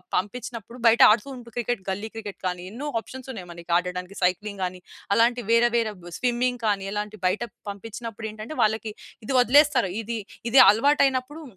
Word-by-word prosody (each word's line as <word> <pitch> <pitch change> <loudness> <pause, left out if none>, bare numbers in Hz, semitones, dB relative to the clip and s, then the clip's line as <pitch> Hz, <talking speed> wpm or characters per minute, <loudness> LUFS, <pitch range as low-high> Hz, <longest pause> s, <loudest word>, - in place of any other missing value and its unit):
పంపించినప్పుడు. 235 +3 -4
బయట 230 +1 +5
ఆడుతూ 215 +5 +2
ఉంటే 235 -2 -12
క్రికెట్ 240 -4 -2
గల్లీ 205 +3 -3
క్రికెట్ 210 -3 -7
గానీ, 180 0 -4
ఎన్నో 265 +7 -6
ఆప్షన్స్ 260 +4 -11
ఉన్నాయి 185 -6 -9
మనకి 170 0 -12
ఆడడానికి. 180 +2 -4
సైక్లింగ్ 195 +2 -1
గాని, 180 0 -6 0.3
అలాంటి 240 +1 +3
వేరే, 235 +1 +5
వేరే 225 -2 0
బ్ 175 - -9
స్విమ్మింగ్ 245 0 0
కానీ 200 -2 0
ఎలాంటి 210 0 -4
బయట 185 +5 0 0.3
పంపించినప్పుడు 225 +2 -7
ఏంటంటే, 215 +7 -8
వాళ్ళకి 220 0 0 0.3
ఇది 265 - -2
వదిలేస్తారు. 265 - +4
ఇది 230 +1 -4 0.3
ఇది 265 - +7
అలవాటయినప్పుడు 275 +5 +2
225 Hz, 160 wpm, -25 LUFS, 200-245 Hz, 0.3 s, ఇది